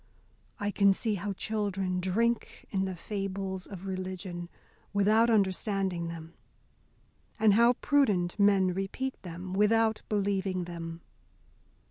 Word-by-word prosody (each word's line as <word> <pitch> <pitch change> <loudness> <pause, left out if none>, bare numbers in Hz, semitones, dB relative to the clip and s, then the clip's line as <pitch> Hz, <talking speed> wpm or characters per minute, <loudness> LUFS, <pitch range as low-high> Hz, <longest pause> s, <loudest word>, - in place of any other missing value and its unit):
I 205 0 -1
can 200 0 +4
see 220 +2 -1
how 200 +1 -3
children 195 -3 -2
drink 230 +6 -1
in 190 -1 0
the 190 -1 -4
fables 195 0 -4
of 195 -2 -9
religion, 185 -2 -5 0.4
without 215 +3 +4
understanding 195 -4 +1
them, 165 0 -8 1.1
and 215 -2 +5
how 235 +3 +6
prudent 210 -11 +1
men 195 -2 +4
repeat 195 +8 -3
them 180 +1 -7
without 220 +2 +3
believing 195 -3 0
them. 170 -1 -7
195 Hz, 115 wpm, -30 LUFS, 185-210 Hz, 1.1 s, how